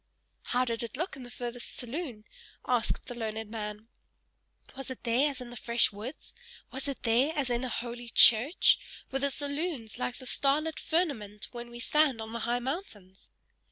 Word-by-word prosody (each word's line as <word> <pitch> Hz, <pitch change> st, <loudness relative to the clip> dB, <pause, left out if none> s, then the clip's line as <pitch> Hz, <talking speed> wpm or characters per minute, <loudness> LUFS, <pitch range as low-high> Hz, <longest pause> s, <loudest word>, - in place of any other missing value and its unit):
"How 250 Hz, +1 st, +2 dB
did 230 Hz, -2 st, -2 dB
it 235 Hz, +1 st, -5 dB
look 350 Hz, +5 st, -2 dB
in 270 Hz, -, -10 dB
the 245 Hz, -, -9 dB
furthest 245 Hz, 0 st, -6 dB
saloon?" 245 Hz, -4 st, -5 dB, 0.4 s
asked 245 Hz, -3 st, +1 dB
the -, -, -6 dB
learned 220 Hz, -2 st, -4 dB
man. 210 Hz, -1 st, -5 dB, 0.9 s
"Was 270 Hz, -1 st, -6 dB
it 260 Hz, -, -7 dB
there 250 Hz, +5 st, +3 dB
as 275 Hz, -2 st, -6 dB
in 245 Hz, -1 st, -8 dB
the -, -, -8 dB
fresh 235 Hz, 0 st, +3 dB
woods? 220 Hz, +8 st, -5 dB, 0.4 s
Was 265 Hz, +2 st, -3 dB
it 275 Hz, -, -4 dB
there 250 Hz, +7 st, +3 dB
as 275 Hz, -4 st, 0 dB
in 240 Hz, +1 st, 0 dB
a 255 Hz, -, -2 dB
holy 240 Hz, 0 st, -4 dB
church? 240 Hz, +7 st, +7 dB, 0.3 s
Were 270 Hz, -, 0 dB
the 280 Hz, +1 st, +1 dB
saloons 285 Hz, -5 st, -2 dB
like 250 Hz, -, -1 dB
the 260 Hz, -, -10 dB
starlit 295 Hz, +5 st, +2 dB
firmament 225 Hz, -, -1 dB
when 240 Hz, -1 st, -7 dB
we 240 Hz, -, -9 dB
stand 280 Hz, 0 st, +3 dB
on 220 Hz, 0 st, -6 dB
the 235 Hz, -, -3 dB
high 240 Hz, -, +2 dB
mountains?" 240 Hz, -, -5 dB
245 Hz, 185 wpm, -30 LUFS, 230-275 Hz, 0.9 s, church